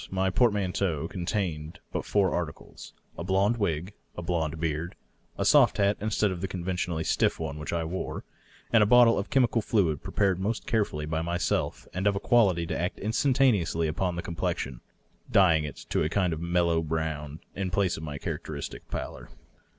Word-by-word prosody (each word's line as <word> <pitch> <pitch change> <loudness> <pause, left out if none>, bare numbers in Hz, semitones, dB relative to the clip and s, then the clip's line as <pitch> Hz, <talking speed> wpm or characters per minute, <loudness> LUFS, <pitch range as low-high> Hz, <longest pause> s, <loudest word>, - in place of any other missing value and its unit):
My 95 0 0
portmanteau 95 - +1
contained 85 -3 -3
but - - -3
four 100 -3 +2
articles 85 -5 -6
— - - -33
a - - -3
blond 100 +5 +2
wig, 90 -2 -1 0.2
a 90 - -4
blond 80 -2 -1
beard, 80 +1 -2 0.4
a - - -1
soft - - +5
hat 100 0 +3
instead 105 -1 +1
of 90 -2 -5
the 95 - -1
conventionally 90 -2 -2
stiff - - +1
one 75 -2 -4
which 75 - -5
I 85 -1 0
wore, 90 +3 -4 0.5
and 115 - +6
a 105 - +5
bottle 120 -1 +6
of 100 - -4
chemical 125 -3 +3
fluid 90 -10 +1
prepared 95 -3 0
most 105 +4 -2
careftilly 100 -10 -1
by 80 +1 -1
myself 85 +1 -1
and 95 +3 0
of 100 - +3
a - - -1
quality 100 -8 +3
to 80 -1 -3
act 90 +2 -2
instantaneously 110 - +2
upon 90 +3 -1
the 85 - -4
complexion, 65 -7 -3 0.5
dyeing 80 -6 +5
it 75 - -6 0.2
to - - +2
a 75 - +1
kind 90 -1 +1
of 80 - -5
mellow 85 -1 +2
brown 80 -1 -3 0.2
in 95 -1 -2
place 90 -1 +1
of - - -7
my 75 -2 -5
char - - -3
acteristic 75 -2 -6
pallor. - - -6
90 Hz, 185 wpm, -28 LUFS, 80-100 Hz, 0.5 s, and